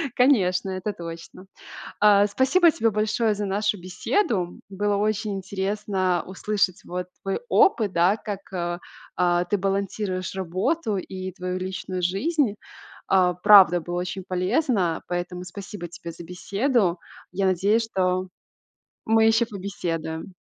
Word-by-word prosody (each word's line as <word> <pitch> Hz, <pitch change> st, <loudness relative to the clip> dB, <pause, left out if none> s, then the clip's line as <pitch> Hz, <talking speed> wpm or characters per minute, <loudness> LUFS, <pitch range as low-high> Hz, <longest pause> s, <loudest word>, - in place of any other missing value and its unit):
конечно, 195 Hz, -8 st, +3 dB
это 185 Hz, +2 st, -3 dB
точно. 170 Hz, +2 st, -9 dB, 0.6 s
А, 205 Hz, -1 st, +6 dB
спасибо 265 Hz, -, +4 dB
тебе 225 Hz, -6 st, +1 dB
большое 215 Hz, +1 st, +1 dB
за 205 Hz, 0 st, -3 dB
нашу 205 Hz, +1 st, 0 dB
беседу. 185 Hz, -, -1 dB
Было 205 Hz, +1 st, -1 dB
очень 210 Hz, 0 st, 0 dB
интересно 190 Hz, -1 st, -1 dB
услышать 195 Hz, 0 st, -1 dB
вот 180 Hz, 0 st, -4 dB, 0.2 s
твой 195 Hz, -, -2 dB
опыт, 215 Hz, -, +3 dB
да, 175 Hz, +4 st, +4 dB
как, 205 Hz, -2 st, -5 dB
а 175 Hz, -1 st, -3 dB, 0.4 s
а 175 Hz, -1 st, +2 dB
ты 205 Hz, -, +1 dB
балансируешь 195 Hz, -1 st, -2 dB
работу 195 Hz, -, -1 dB
и 185 Hz, 0 st, -6 dB
твою 185 Hz, 0 st, -4 dB
личную 185 Hz, 0 st, -4 dB
жизнь. 215 Hz, -, +1 dB, 0.5 s
А, 180 Hz, -2 st, +3 dB
правда, 185 Hz, -2 st, +7 dB
было 175 Hz, +2 st, -5 dB
очень 180 Hz, +1 st, -5 dB
полезно, 185 Hz, -, 0 dB
поэтому 180 Hz, 0 st, -4 dB
спасибо 195 Hz, 0 st, -8 dB
тебе 170 Hz, 0 st, -8 dB
за 165 Hz, -, -10 dB
беседу. 195 Hz, -, 0 dB, 0.3 s
Я 195 Hz, +1 st, 0 dB
надеюсь, 200 Hz, +5 st, +2 dB
что 185 Hz, -1 st, 0 dB, 0.8 s
мы 225 Hz, 0 st, +4 dB
ещё 225 Hz, +1 st, +3 dB
побеседуем. 180 Hz, -4 st, -5 dB
190 Hz, 130 wpm, -24 LUFS, 180-210 Hz, 0.8 s, правда